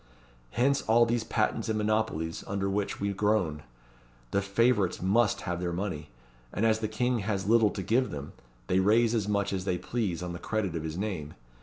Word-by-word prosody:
Hence 135 +4 +2
all 115 +2 +4
these 115 0 0
patents 110 0 -1
and 110 - 0
monopolies 105 -7 -1
under 100 -1 -1
which 100 +1 -2
we 100 0 -1
groan. 95 -7 +1 0.7
The 100 - +2
favourites 100 -1 +2
must 105 +4 +2
have 90 0 -3
money; 85 -6 -4 0.4
and 110 - 0
as 110 -1 +3
the 110 - -1
King 120 +3 0
has 100 -2 -2
little 115 -1 +5
to 95 - -5
give 120 +7 +2
them, 70 0 -7 0.3
they 90 - +2
raise 110 +4 +4
as 110 -4 0
much 100 -1 0
as 95 -1 -2
they 90 -2 0
please 90 -2 -2
on 90 -1 -4
the 85 - -6
credit 100 -5 -2
of 80 - -2
his 80 +1 -5
name. 90 -8 -4
100 Hz, 190 wpm, -29 LUFS, 90-110 Hz, 0.7 s, little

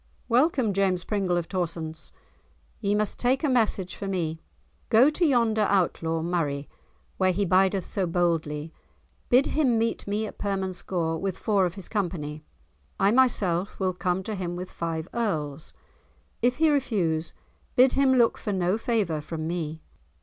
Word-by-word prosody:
"Welcome, 255 -3 +2
James 190 -2 +1
Pringle 195 -4 0
of 170 - -2
Torsonse, 165 -3 -4 0.7
ye 205 -1 0
must 210 -1 -1
take 255 +5 +1
a - - +3
message 220 -8 +1
for 200 - -5
me; 165 -4 -2 0.5
go 245 +6 +6
to 345 - -1
yonder 230 -8 +3
Outlaw 165 -4 +1
Murray, 150 -5 -1 0.5
where 185 -1 +3
he 200 +3 0
bideth 190 +1 +3
so 190 -3 -1
boldly; 165 -3 -1 0.6
bid 255 +3 +5
him 265 -7 +2
meet 225 -1 -1
me 210 +2 -1
at - - -9
Permanscore 185 -4 -2
with 195 -2 -3
four 200 -4 +2
of 175 - -8
his 195 -3 -8
company, 160 -7 -3 0.6
I 195 +1 +4
myself 205 -7 +2
will 185 -1 0
come 180 +1 -1
to 215 - -4
him 180 -3 -3
with 180 +1 -6
five 165 -1 -3
Earls. 155 -11 -2 0.7
If 245 +2 +2
he 315 0 +4
refuse, 180 - 0 0.4
bid 255 +1 +5
him 270 -1 +4
look 235 -2 +3
for 210 - -3
no 185 +2 0
favour 205 -10 0
from 155 +1 -5
me. 160 -2 -4
190 Hz, 155 wpm, -26 LUFS, 170-220 Hz, 0.7 s, go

